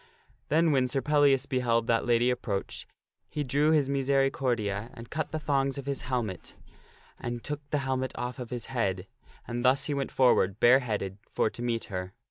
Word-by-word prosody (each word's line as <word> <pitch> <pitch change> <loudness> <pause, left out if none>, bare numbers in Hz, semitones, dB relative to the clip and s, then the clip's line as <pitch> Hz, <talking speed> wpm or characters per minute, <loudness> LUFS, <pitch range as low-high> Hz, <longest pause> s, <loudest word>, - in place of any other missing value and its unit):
Then 160 +2 +3
when 130 -3 +3
Sir 135 - 0
Pellias 145 -2 +3
beheld 120 -4 +1
that 115 0 +1
lady 120 +1 +3
approach, 115 -5 -4 0.4
he 150 -1 -2
drew 145 +3 +2
his 150 -4 +3
miseri 135 0 +2
cordia 110 -4 -1
and 115 -1 -11
cut 155 0 -3
the 155 - -2
thongs 140 -2 0
of 140 - -6
his 140 -1 -2
helmet, 120 -8 -4 0.6
and 120 0 -5
took 150 0 -4
the 150 - +1
helmet 130 -1 -1
off 125 0 -4
of 125 -2 -6
his 120 -1 -4
head, 95 -6 -1 0.4
and 120 +1 -3
thus 130 +1 +3
he 150 - -1
went 140 -1 -2
forward, 110 -6 +3
bareheaded, 110 -6 +3
for 110 - 0
to - - -9
meet 120 -2 -1
her. 90 0 -4
125 Hz, 185 wpm, -28 LUFS, 115-140 Hz, 0.6 s, Then